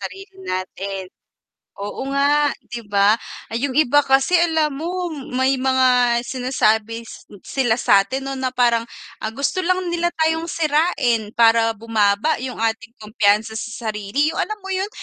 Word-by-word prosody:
Sarili 390 0 -9
natin, 190 - -4 0.7
oo 205 +6 -5
nga 285 +2 +2 0.2
'di 240 - -4
ba. 205 +2 +3 0.3
Yung 255 +3 -2
iba 290 -1 +5
kasi 270 +2 +2
alam 320 -3 +1
mo, 355 +1 -3 0.2
may 260 0 +2
mga 255 -2 +3
sinasabi 230 -3 0
s - - -13 0.2
sila 245 -5 0
satin 255 +4 +2
'no, 275 - -4
na 260 -1 -2
parang, 235 -2 +1 0.3
ang 220 - -4
gusto 280 +7 -1
lang 370 0 +1 0.2
nila 345 0 +1
tayong 320 +1 0
sirain, 295 -9 +1
para 225 -1 +4
bumaba 220 +5 +1
yung 260 0 -5
ating 225 +1 -3
kumpiyansa 215 0 +1
sa 220 0 -4
sarili, 215 +10 -1
yung - - -2
alam 430 - -2
mo 385 - -4
yun, 380 +2 -1
255 Hz, 150 wpm, -20 LUFS, 220-295 Hz, 0.7 s, iba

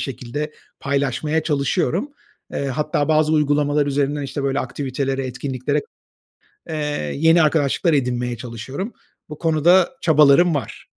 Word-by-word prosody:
şekilde 135 +4 -5 0.3
paylaşmaya 140 +3 0
çalışıyorum. 160 - 0 0.4
Eee, 140 - -2
hatta 145 +2 -1
bazı 155 0 +3
uygulamalar 145 -1 +2
üzerinden, 145 +1 0
işte, 140 +1 -4
böyle 135 0 0
aktivitelere, 135 +1 -3
etkinliklere, 130 0 -2 0.9
eee, 160 - -3 0.4
yeni 165 +2 +5
arkadaşlıklar 155 +2 +2
edinmeye 125 -3 0
çalışıyorum. 130 - -6 0.4
Bu 150 - -8
konuda 170 +3 +4
çabalarım 155 +2 +5
var. 130 -7 -5
145 Hz, 115 wpm, -21 LUFS, 135-155 Hz, 0.9 s, yeni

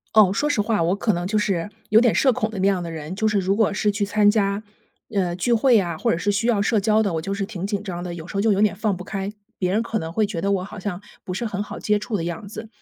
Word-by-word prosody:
哦， 200 -3 +6
说 295 +7 0
实 230 -8 +2
话， 210 -5 +1
我 180 +4 +2
可 215 0 +1
能 175 +1 -2
就 215 +3 0
是 195 -3 0 0.2
有 220 +2 +6
点 240 -3 +4
社 260 -3 +4
恐 215 0 -1
的 200 - -5
那 195 - +3
样 190 -3 +1
的 170 - -5
人。 160 +3 -6
就 220 +1 +1
是 210 - +2
如 195 +1 +1
果 215 -2 +2
是 210 - +1
去 205 0 -2
参 205 +1 +3
加， 200 -1 +1 0.5
呃， 185 -4 +1
聚 235 +6 +1
会 235 -1 +5
啊， 170 -4 -2
或 - - +1
者 - - +1
是 205 +3 0
需 225 +4 0
要 215 -4 +3
社 210 0 +2
交 215 +1 +3
的， 200 -5 0
我 160 - -1
就 195 +4 -3
是 200 0 -2
挺 190 -1 -5
紧 200 -1 -2
张 180 -4 -5
的， 175 - -5
有 170 0 -8
时 - - -9
候 200 - +2
就 220 - +3
有 200 - +2
点 215 - +3
放 210 -4 0
不 180 - -7
开。 195 +1 -4 0.3
别 180 -1 0
人 215 +3 +2
可 225 -2 -2
能 160 0 -5
会 215 +5 +1
觉 195 -5 -4
得 200 - +1
我 190 -2 0
好 200 +1 -8
像 190 -1 -4 0.2
不 180 - -5
是 235 +6 -3
很 205 -2 -3
好 - - -8
接 210 0 +2
触 210 0 -3
的 165 - -3
样 175 +4 -5
子。 220 +1 -7
200 Hz, 340 characters per minute, -23 LUFS, 185-215 Hz, 0.5 s, 哦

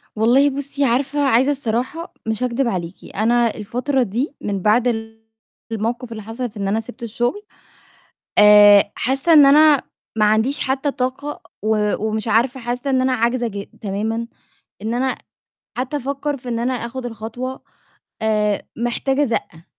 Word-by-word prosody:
والله 250 +6 +4
بُصّي، 280 +1 -3
عارفة 270 +4 0
عايزة 270 -1 +3
الصراحة؟ 270 +5 -3
مش 220 +2 -1
هاكدب 250 +1 0
عليكِ. 180 -5 -5
أنا 235 +3 +3
الفترة 250 +6 -1
دي 245 +7 -3
من 200 -2 -3
بعد 225 +5 +3
ال 225 -1 -4 0.4
الموقف 230 +2 -3
اللي 215 -2 -7
حصل 235 +4 -5
في 215 - -14
إن 200 -1 -2
أنا 210 +3 +1
سِبت 240 +2 -10
الشغل، 240 - -2 1.0
آآ، 205 -1 +7
حاسة 270 +6 +1
إن 295 -3 +9
أنا 295 0 +6 0.3
ما 215 -1 +3
عنديش 220 +6 +2
حتى 270 +2 0
طاقة 265 +3 -3 0.2
و 210 -1 +1
ومش 220 +1 -2
عارفة، 240 +5 +2
حاسة 245 +3 -3
إن 260 -1 +2
أنا 260 0 +1
عاجزة 240 +1 0
ج 200 -2 -5 0.2
تمامًا، 220 +3 -2 0.5
إن 220 +3 -2
أنا 260 +1 0 0.6
حتى 260 +4 -2
أفكر 280 +1 -3
في 250 -2 -10
إن 235 -1 -1
أنا 245 +2 0
آخد 245 +1 -5
الخطوة، 240 +3 -6 0.6
آآ، 210 -2 +1 0.2
محتاجة 265 +4 0
زقة، 175 - -4
240 Hz, 155 wpm, -20 LUFS, 220-265 Hz, 1.0 s, إن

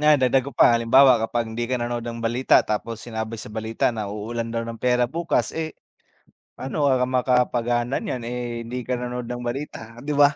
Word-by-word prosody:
nga 150 0 +6
dagdag 130 0 +3
ko - - -10
pa - - +7
halimbawa 120 +2 +6
kapag 115 +1 -1
hindi 120 +1 -3
ka 130 - +1
nanood 120 0 -2
ng 115 0 -6
balita 120 +3 +3
tapos 115 +2 -2
sinabi 110 -1 -4
sa 105 - -9
balita 110 +2 -1
na 110 -3 -4
uulan 115 +3 -4
daw 115 0 -2
ng 115 -1 -7
pera 125 -1 +3
bukas, 165 +7 -1
eh, 160 -1 -4 0.8
paano 135 +3 -3
ka 130 -2 +3
makakapagaanan 125 -1 +1
'yan, 125 - -3
eh, 120 -1 -4
hindi 120 +2 -5
ka 125 0 -2
nanonood 125 0 -4
ng 120 - -5
balita 120 -2 -5
'di 150 - -2
ba? 145 0 +6
120 Hz, 195 wpm, -23 LUFS, 115-130 Hz, 0.8 s, pa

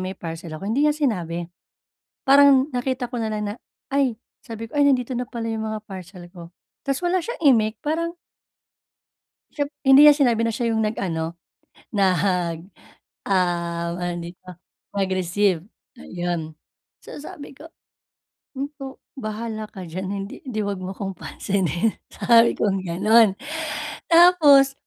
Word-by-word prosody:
may 185 +1 -4
parcel 165 -1 -7
ako, 195 - -9
hindi 270 +8 +2
niya 300 - 0
sinabi. 175 - -1 0.8
Parang 275 0 +6
nakita 250 -1 -2
ko 245 - -4
na 225 - -1
lang 215 -1 -3
na, - - -5 0.4
Ay, 275 -4 +2 0.3
sabi 225 -1 -7
ko, 290 - -4
ay, 285 - +5
nandito 255 -2 +1
na 250 - -3
pala 230 -1 -4
'yung 220 0 -3
mga 215 -1 -4
parcel 185 -3 -10
ko. 175 -1 -12 0.3
Tapos 275 +5 -1
wala 360 +1 +2
siyang 470 +9 -6
imik, 215 -2 +1
parang 335 +3 -1 1.4
siyempre 290 0 -3
hindi 270 +1 +8
niya 295 -1 +9
sinabi 245 -6 +3
na 230 - 0
siya 235 +1 -1
'yung 220 0 +1
nag-ano, 170 -6 -2 0.6
nag 180 -4 +1 0.7
ah, 170 -3 0
ano 175 0 -3
dito, 175 +2 -11 0.5
mag-receive, 190 -1 +1 0.4
ayun. 175 -3 -4 0.5
So - - -9
sabi 300 -1 -10
ko, 320 - -12 1.1
o, 270 0 -8 0.2
bahala 220 -1 -4
ka 190 - -9
diyan. 185 +3 -5 0.2
Hindi - - -10
hindi, 240 -4 -4
'wag 200 -1 -3
mo 185 +1 -5
akong 195 0 -5
pansinin, 190 +1 -1 0.2
sabi 235 -1 +4
kong 195 -2 0
ganon. 210 +4 +4 0.7
Tapos 330 -6 +7
215 Hz, 140 wpm, -23 LUFS, 180-265 Hz, 1.4 s, niya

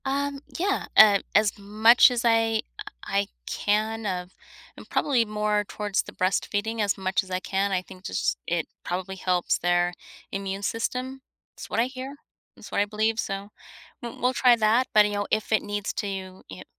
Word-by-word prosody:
Um, 280 +1 -1 0.2
yeah, 390 +3 -1
uh, 205 -2 +8 0.2
as 210 0 +3
much 215 +5 +6
as 245 -1 -2
I, 225 -1 +3 0.2
uh, - - -7 0.2
I 200 0 0 0.2
can 215 +2 -1
of 180 -1 -3 0.4
and - - -13
probably 255 -6 +2
more 210 0 0
towards 205 -1 -1
the - - -10
breastfeeding 205 +4 -1
as 205 -1 +1
much 190 0 0
as 190 - -14
I 185 0 -1
can. 195 +2 -1
I 185 -1 +1
think 185 0 -14
just - - -1
it 170 -2 0 0.2
probably 185 +2 -4
helps 180 -1 0
their 175 0 +1 0.4
immune 195 0 -4
system. 255 +5 -3 0.3
It's - - -10
what - - -1
I 235 - +4
hear. 260 +2 -7 0.4
It's - - -12
what - - +1
I - - +2
believe. 220 +2 -1
So 195 -1 -3 0.5
w 235 -1 -7
we'll 250 +2 +2
try 250 -2 +5
that. 230 +3 +2
But, 210 -1 +7
you 205 - -2
know, 205 0 -2
if 215 0 -1
it 220 - +3
needs 205 0 -3
to 205 - -3
you 190 -1 -6
i 95 - -9
210 Hz, 190 wpm, -26 LUFS, 195-225 Hz, 0.5 s, uh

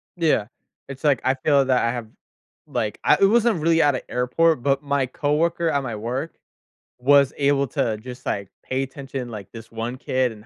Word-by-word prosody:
Yeah. 160 - +2 0.4
It's 135 -1 -9
like, 145 -5 +3
I 130 - +4
feel 140 0 +2
that 130 -2 +2
I 115 - +1
have 120 -2 -5 0.6
like - - -2
I - - +5
it - - +8
wasn't 225 -5 +2
really 165 0 +3
at 145 -3 +3
a - - -7
airport, 125 +4 +2
but 140 +1 +1
my 140 -1 +1
coworker 165 +5 0
at 140 -3 0
my 115 -4 -4
work 125 +9 -4 0.6
was 140 +1 +4
able 140 -1 +2
to 110 -2 -1
just, 125 +3 -10
like, 100 -1 -2 0.2
pay 130 +1 -1
attention, 135 -2 -6
like, 105 -4 -8
this 115 -1 -11
one 115 +3 -4
kid 130 -1 0
and 110 0 -13
135 Hz, 195 wpm, -23 LUFS, 125-145 Hz, 0.6 s, it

